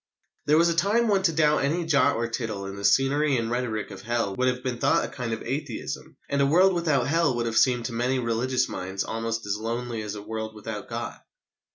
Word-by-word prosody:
There 150 +1 +5
was 170 +1 +5
a - - +2
time 205 +7 +2
when 200 -3 +3
to 185 -3 +3
doubt 150 -2 +3
any 165 +5 0
jot 140 -3 +3
or 115 +1 -1
tittle 110 -4 -4
in 95 0 -6
the 100 - -8
scenery 135 +7 +3
and 115 -1 -2
rhetoric 120 -4 -2
of 95 -1 -9
Hell 115 -3 -1
would 130 +3 +1
have 125 0 -1
been 125 -2 -3
thought 135 - +3
a - - -4
kind 125 -3 -5
of 110 - -3
atheism, 135 -1 -5
and 140 0 0
a 140 - +4
world 185 +6 +5
without 155 -8 +1
Hell 160 -2 +2
would 120 0 -1
have 115 -1 -2
seemed 120 0 +3
to 120 - -3
many 125 +3 0
religious 125 +1 0
minds 95 +1 -4
almost 115 0 -3
as 105 0 -1
lonely 115 +1 -3
as 105 0 -5
a 105 - -7
world 110 0 -5
without 105 -1 -7
God. - - -5
125 Hz, 235 wpm, -26 LUFS, 110-145 Hz, -, There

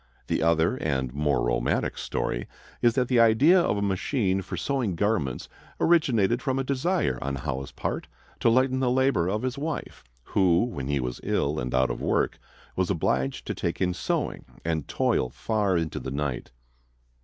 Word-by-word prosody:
The - - -1
other 85 +7 +2
and 65 - -1
more 70 -4 +1
romantic - - 0
story - - -3 0.3
is 120 -1 +4
that 125 -2 +2
the 125 -2 +3
idea 115 +11 +6
of 105 - +1
a 100 - -1
machine 95 0 0
for 90 -1 -6
sewing 120 -3 -1
garments 85 - -1 0.3
originated 125 - +3
from 135 -3 -1
a 135 - 0
desire 140 +7 0
on 70 0 -2
Howe's 70 -1 -4
part - - -4 0.3
to - - +4
lighten 130 +2 +3
the 130 -2 +2
labor 125 -9 +2
of 105 +4 -1
his 130 +2 -2
wife, 155 +2 -4 0.2
who, 90 - +3
when 70 - -4
he 70 -1 0
was 60 -1 -3
ill 75 +2 0
and 60 0 -3
out 65 0 +3
of - - -5
work, - - 0 0.4
was - - 0
obliged 65 +1 0
to - - -2
take 85 - -3
in 90 -1 +1
sewing 85 - -2 0.2
and 80 -3 -1
toil 65 - +1
far 100 - 0
into 80 -2 -2
the 65 - -5
night. 70 -2 -3
95 Hz, 180 wpm, -26 LUFS, -, 0.4 s, idea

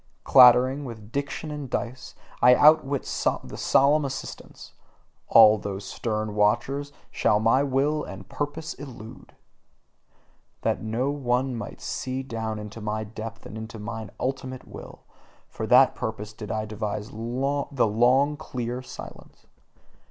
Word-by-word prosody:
Clattering 130 +2 +6
with 115 -4 -9
diction 140 +3 -4
and 145 -3 -6
dice, 125 +1 -4 0.3
I 125 0 +7
outwit 145 -2 +4 0.4
the - - -9
solemn 145 +3 +3
assistants: 135 -1 -7 0.5
all 110 -1 +7
those 100 0 -5
stern 110 -2 -3
watchers, 120 +7 +1 0.2
shall 105 - +2
my 115 +5 +3
will 145 +2 +1
and 95 0 -9
purpose 150 +7 -4
elude. 120 -6 -11 1.3
That - - 0
no 115 +5 -1
one 130 -2 -1
might 115 -2 -7
see 130 +1 -4
down 115 -4 -4
into 105 +1 -8
my 105 +1 -2
depth 110 +1 -8
and - - -9
into 110 +1 -7
mine 110 0 -6
ultimate 130 0 -4
will - - -11 0.5
for 110 - -6
that 130 +3 +6
purpose 110 -1 -5
did 105 -1 -9
I 110 -1 -2
devise 105 0 -4
the 130 +3 -1
long 130 +7 +3
clear 125 -4 -4
silence. 130 - -12
120 Hz, 130 wpm, -25 LUFS, 110-135 Hz, 1.3 s, I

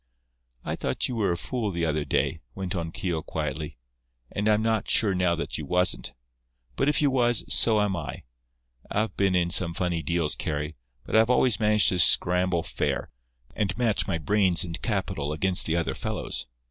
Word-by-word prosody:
"I - - -2
thought - - -1
you 125 - -4
were 105 -5 +1
a 85 - -1
fool 115 +3 -3
the 85 -3 -2
other 75 -1 -1
day," 80 +2 -1
went 95 -1 -4
on 85 -2 -3
Keogh, 85 -2 -3
quietly, 75 0 -5 0.5
"and 105 +1 -2
I'm 105 0 +2
not 110 -2 0
sure 105 -4 +4
now 90 -2 +1
that 80 - -4
you 75 - -5
wasn't. 90 +4 0 0.6
But 135 - +1
if 150 - +1
you 140 - +3
was, 120 -3 +1
so 110 -2 +3
am 105 -2 0
I. 75 -6 -6 0.7
I've 110 +2 -1
been 95 -2 +1
in 85 -1 +1
some 85 -2 +2
funny 85 -2 -1
deals, 80 -1 0
Carry, 75 +1 -4 0.3
but - - -3
I've 110 +1 +5
always 125 -2 +3
managed 105 -1 +4
to 90 - -1
scramble 90 +1 +3
fair, - - -3 0.4
and 105 -3 -1
match 115 -4 +1
my 95 - -1
brains 95 +1 +4
and 85 -1 -5
capital 95 - -2
against 90 +3 +2
the 80 - 0
other 85 -1 -1
fellow's. - - -4
90 Hz, 185 wpm, -26 LUFS, 85-105 Hz, 0.7 s, I've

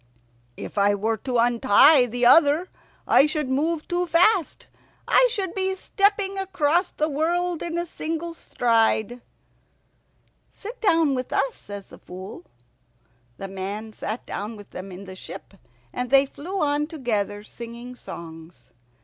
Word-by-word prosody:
"If - - -5
I 205 +1 +4
were 220 +2 -1
to 250 +3 -2
untie 245 +3 +5
the 245 +1 -1
other 315 +6 +5 0.4
I 275 - +6
should 300 -2 -2
move 305 +4 -1
too 355 0 -1
fast. 350 +1 +2 0.4
I - - +5
should 390 -6 -2
be 380 -1 0
stepping 395 0 0
across 355 -2 +1
the 305 - -1
world 340 +3 -1
in 340 0 -3
a 345 - -1
single 330 0 -4
stride." 230 -4 +1 1.3
"Sit 450 +5 -9
down 330 -8 +3
with 255 -1 -3
us," 270 -1 +1
says 200 -1 -9
the - - -15
Fool. 185 0 -10 0.9
The 195 - -6
man 200 +3 -6
sat 215 +3 -5
down 210 +3 -5
with 205 - -13
them 190 +1 -8
in 185 +2 -9
the 185 0 -9
ship, 185 - -9 0.4
and 250 0 -3
they 275 0 +6
flew 350 +8 -5
on 295 0 0
together 215 - -2
singing 235 +2 -9
songs. 160 - -11
270 Hz, 145 wpm, -24 LUFS, 215-340 Hz, 1.3 s, I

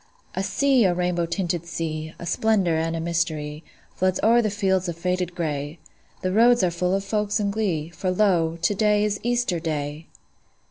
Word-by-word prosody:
A - - -2
sea, 255 +5 +3
a 180 -2 +2
rainbow 175 -1 0
tinted 170 -1 -2
sea, 160 -1 -4
A - - -8
splendor 195 -2 +2
and 165 +1 -1
a - - -2
mystery, 160 -2 -2 0.3
Floods 185 0 +1
o'er 235 +2 +5
the 215 - 0
fields 190 -3 0
of 170 - -5
faded 180 0 -2
gray: 150 -2 -3 0.5
The 185 - 0
roads 235 +3 +5
are 180 - +2
full 180 +2 0
of 195 - -1
folks 210 0 -1
in 200 -1 0
glee, 180 -8 -1
For 175 +2 -3
lo, 180 -4 +2
to 170 +5 +1
day 210 0 +2
is 210 -1 -1
Easter 240 -7 0
Day! 155 -1 -4
180 Hz, 185 wpm, -24 LUFS, 165-205 Hz, 0.5 s, o'er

